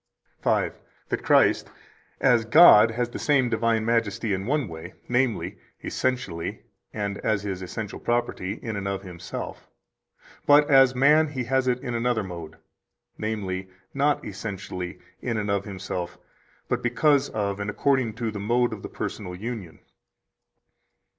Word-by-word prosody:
116 - - -1 0.2
That - - -2
Christ - - +4 0.5
as 120 -4 +4
God 115 -4 +8
has 120 +1 -1
the - - -6
same 130 -5 +2
divine 115 -1 +1
majesty 115 -2 0
in 95 +2 -3
one 145 -1 +1
way, 80 +1 -9
namely, 110 -7 0 0.2
essentially 125 -10 -2 0.3
and 100 -1 -3
as 110 -2 0
His 95 -2 -4
essential 100 +3 -6
property, 120 -5 -1
in 115 -2 -3
and 100 -1 -3
of 100 0 -3
Himself; 90 -2 -7 0.8
but 145 0 +6
as 135 -1 +6
man 150 +4 +5
He 135 -4 -3
has 130 +2 +1
it 125 0 +1
in 120 - -3
another 120 -2 0
mode, 85 -4 -8 0.6
namely, 95 -4 -3 0.2
not 145 +1 +1
essentially 95 -3 -6 0.2
in 115 -3 -2
and 105 -1 -1
of 100 -1 0
Himself, 95 -3 -5 0.5
but - - -1
because 140 +4 +2
of, 100 -2 -2
and 100 0 -3
according 130 0 +1
to, 115 -1 -2
the 105 - -6
mode 120 +3 +1
of 105 - -7
the - - -7
personal 90 -4 -5
union. 105 -4 -6
110 Hz, 145 wpm, -25 LUFS, 95-125 Hz, 0.8 s, God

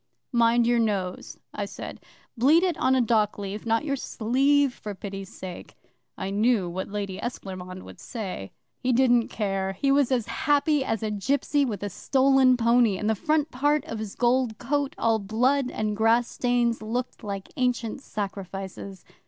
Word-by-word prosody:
'"Mind 235 0 +4
your 240 0 +3
nose," 195 -5 -2 0.2
I - - -3
said. - - -8 0.3
"Bleed 290 +9 +5
it 360 -4 +1
on 260 -2 +3
a 255 - +3
dockleaf 210 -2 -1
not 225 +6 +1
your 280 -2 0
sleeve, 270 +3 +2
for 210 -3 -7
pity's 195 -1 -7
sake." 185 -2 -9 0.4
I 190 +1 -3
knew 210 -1 +2
what 180 +2 -4
the 205 - -12
Lady 200 -2 -3
Esclairmonde 185 -5 -6
would - - -12
say. 190 - -6 0.3
'He 255 - 0
didn't 245 -2 +4
care. 195 -2 -2
He 275 +8 +1
was 275 -2 +3
as 245 -4 +1
happy 290 -1 +1
as 225 -4 -2
a 215 - -1
gipsy 280 +7 +1
with 210 -6 -4
a 205 - -2
stolen 265 +3 +4
pony, 235 -3 +3
and 210 - -2
the 220 - +3
front 305 +7 0
part 290 +3 +1
of 225 - -5
his 215 -2 -6
gold 245 -2 +1
coat, 285 +1 -1
all 225 -1 +2
blood 250 +6 +1
and 215 -3 -2
grass 225 +2 +3
stains, 240 -2 0
looked 240 +3 -4
like 200 -2 -5
ancient 250 -1 -1
sacrifices. 195 -3 -6
230 Hz, 170 wpm, -26 LUFS, 205-260 Hz, 0.4 s, Bleed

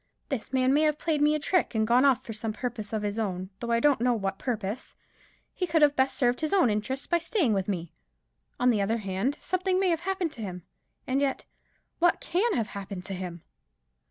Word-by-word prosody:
This 255 -7 -3
man 260 0 +3
may 295 - +4
have 305 -1 +2
played 310 -2 0
me 300 +1 +4
a - - -1
trick, 335 -3 +1
and 220 0 +2
gone 245 +4 +4
off 260 -2 +3
for 225 - -6
some 215 0 -3
purpose 225 -2 -5
of 215 -1 -2
his 205 +2 -2
own, 185 -3 -3
though 235 - -4
I 230 0 +3
don't 280 -2 +3
know 245 0 +3
what 195 -3 -3
purpose. 220 -2 -4 0.6
He 365 - -2
could 320 -1 +3
have 290 -1 +5
best 265 +1 +1
served 245 -2 +2
his 310 +2 -1
own 355 - +4
interests 235 +7 -2
by 345 - +2
staying 330 - +1
with 195 -2 -1
me. 175 -5 -3 0.7
On 250 0 +4
the 210 -3 +1
other 220 +4 +1
hand, 205 +6 -2
something 370 0 0
may 380 -1 +2
have 335 -2 +1
happened 370 -2 -2
to 235 - -10
him. 180 -4 -6 0.4
And 265 +2 0
yet 275 -2 -1 0.5
what 345 0 +3
can 410 +6 0
have 225 -3 -1
happened 195 -2 -6
to 195 - -5
him?" 180 -3 -6
245 Hz, 225 wpm, -28 LUFS, 210-300 Hz, 0.7 s, have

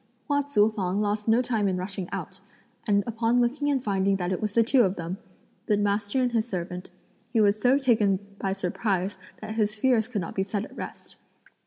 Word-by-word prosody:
Hua 285 -1 +2
Tzu 220 -7 +3
fang 190 -1 -1
lost 210 +1 -1
no 230 +3 +4
time 225 -5 0
in 185 -1 0
rushing 185 0 -5
out; - - -5 0.5
and 200 -1 +3
upon 230 +1 +1
looking 270 +5 +1
and 270 -3 +1
finding 195 -2 +1
that 180 -1 -2
it 185 - -2
was 210 -1 -2
the 230 - +5
two 255 +3 +4
of 190 -4 +2
them, 175 +2 -5 0.5
the 210 - +3
master 205 +3 0
and 250 - +1
his 230 -1 0
servant, 180 -2 -5 0.4
he 230 - +2
was 210 0 +3
so 255 +2 +5
taken 220 -8 +3 0.2
by 195 - -1
surprise 190 0 -1 0.2
that 215 0 -5
his 215 -1 0
fears 225 -1 +2
could 225 -5 -2
not 165 - -5
be 190 - -1
set 200 +1 -3
at - - -14
rest. - - -9
210 Hz, 210 wpm, -26 LUFS, 195-235 Hz, 0.5 s, the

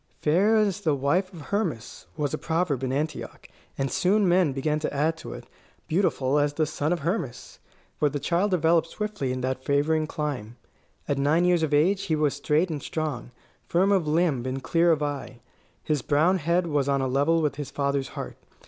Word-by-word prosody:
"Fair 190 +9 +3
as 205 -2 +1
the 155 -6 +1
wife 170 +8 0
of 170 -5 -10
Hermas" 155 - -3
was 145 -1 -1
a - - 0
proverb 160 -5 -1
in 130 - -1
Antioch; 150 +2 -4 0.3
and 135 -1 -1
soon 200 +2 +2
men 175 -3 +3
began 150 +3 -1
to 155 - -2
add 150 +3 +1
to - - -9
it, - - -9 0.4
"Beautiful 150 -5 +1
as 145 0 +1
the 155 +1 +1
son 155 0 -2
of 175 -2 0
Hermas"; 150 - -4 0.4
for 150 - +3
the 145 +1 -3
child 180 +7 +1
developed 165 -2 +3
swiftly 210 -9 -3
in 130 0 -3
that 130 0 -2
favouring 155 +3 +1
clime. 135 -8 -4 0.5
At 140 -1 0
nine 155 +5 +3
years 175 -2 +3
of 160 -2 0
age 185 +7 +2
he 160 - +1
was 150 -2 +1
straight 150 +5 +1
and 150 -3 -4
strong, 155 -6 -4 0.4
firm 190 +4 +2
of 185 -6 +2
limb 155 -5 +1
and 130 +1 -4
clear 170 0 +3
of 150 -2 +1
eye. 140 -4 -4 0.4
His 150 -3 0
brown 160 +9 +2
head 170 +3 +1
was 145 -4 0
on 140 -1 +2
a 130 - 0
level 145 +6 +2
with 145 -2 -1
his 145 -3 -5
father's 140 -1 -1
heart. - - -6
150 Hz, 200 wpm, -26 LUFS, 140-175 Hz, 0.5 s, Fair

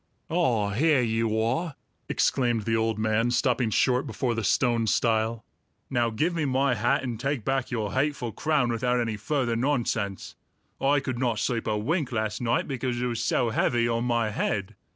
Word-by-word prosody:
"Ah, 120 -12 +1
here 140 +4 +3
you 115 -1 0
are!" 135 +8 -1 0.3
exclaimed 120 -4 +1
the 115 +2 0
old 110 0 0
man, 110 +2 +1
stopping 125 -1 +1
short 125 +4 +2
before 125 -3 -1
the 115 -1 -3
stone 115 +2 +2
stile. 110 0 +1 0.5
"Now 120 -2 +2
give 150 +11 0
me 165 -2 -1
my 135 -1 +2
hat 120 +3 +1
and 120 -4 -4
take 135 -4 -2
back 135 -1 0
your 110 -5 -2
hateful 130 -3 -1
crown 145 0 +1
without 125 +1 0
any 115 -2 -1
further 120 +2 -1
nonsense! 115 -6 -1 0.5
I 140 +1 +3
could 130 -3 -4
not 120 -3 0
sleep 115 +1 -1
a 105 -1 0
wink 145 - -1
last 110 -1 -2
night, 120 +1 0
because 130 -3 -2
it 125 - -1
was 120 -1 -2
so 120 -1 +1
heavy 120 +1 +1
on 115 0 0
my 115 -3 +1
head. 100 -2 -2
120 Hz, 180 wpm, -26 LUFS, 110-130 Hz, 0.5 s, here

